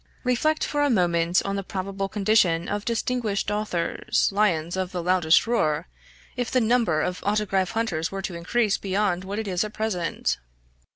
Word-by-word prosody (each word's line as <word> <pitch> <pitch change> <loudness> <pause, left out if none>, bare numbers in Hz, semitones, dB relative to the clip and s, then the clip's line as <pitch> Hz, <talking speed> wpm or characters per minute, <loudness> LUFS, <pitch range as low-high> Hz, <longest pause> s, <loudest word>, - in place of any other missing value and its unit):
Reflect 275 +5 +1
for 290 - -1
a 290 - +3
moment 175 -5 +2
on 200 0 -1
the 195 - -3
probable 195 +1 -4
condition 195 -5 +2
of 205 0 -3
distinguished 230 -3 -1
authors, 210 -5 0
lions 175 -5 +1
of 185 -1 -2
the 180 -2 -3
loudest 175 -2 +4
roar, 155 - 0 0.5
if 245 -2 -2
the 255 - +2
number 225 -9 +2
of 180 +2 -3
autograph 200 -2 0
hunters 170 -8 -1
were 195 0 -5
to 185 - -4
increase 200 +5 0
beyond 190 -2 0
what 195 +2 -5
it 220 -1 -3
is 185 -1 0
at 215 0 -6
present. 205 -6 -1
195 Hz, 170 wpm, -25 LUFS, 180-220 Hz, 0.5 s, loudest